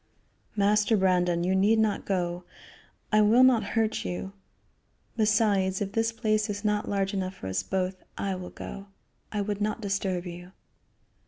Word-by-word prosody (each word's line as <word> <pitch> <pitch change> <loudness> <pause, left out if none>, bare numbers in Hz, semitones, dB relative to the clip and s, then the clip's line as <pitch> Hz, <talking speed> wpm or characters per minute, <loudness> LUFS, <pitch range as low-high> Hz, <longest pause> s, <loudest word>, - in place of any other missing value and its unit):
"Master 210 +1 +3
Brandon, 180 -2 +2
you 185 +2 +1
need 200 +4 +4
not 220 -2 +1
go. 180 -2 -1 0.7
I 215 0 +5
will 225 +4 +6
not 250 -4 +5
hurt 220 -1 +1
you. 190 +2 -5 0.8
Besides, 205 -4 +2
if 195 -1 -3
this 225 +1 +1
place 215 -1 0
is 205 +1 -4
not 210 0 0
large 195 -1 0
enough 190 -1 -2
for - - -10
us 95 0 -1
both, 185 - -3
I 195 -1 -1
will 185 -1 -6
go. 200 0 -8 0.4
I 210 - -1
would 205 0 -3
not 215 +2 -1
disturb 195 -3 -2
you." 175 +1 -9
200 Hz, 160 wpm, -27 LUFS, 185-215 Hz, 0.8 s, will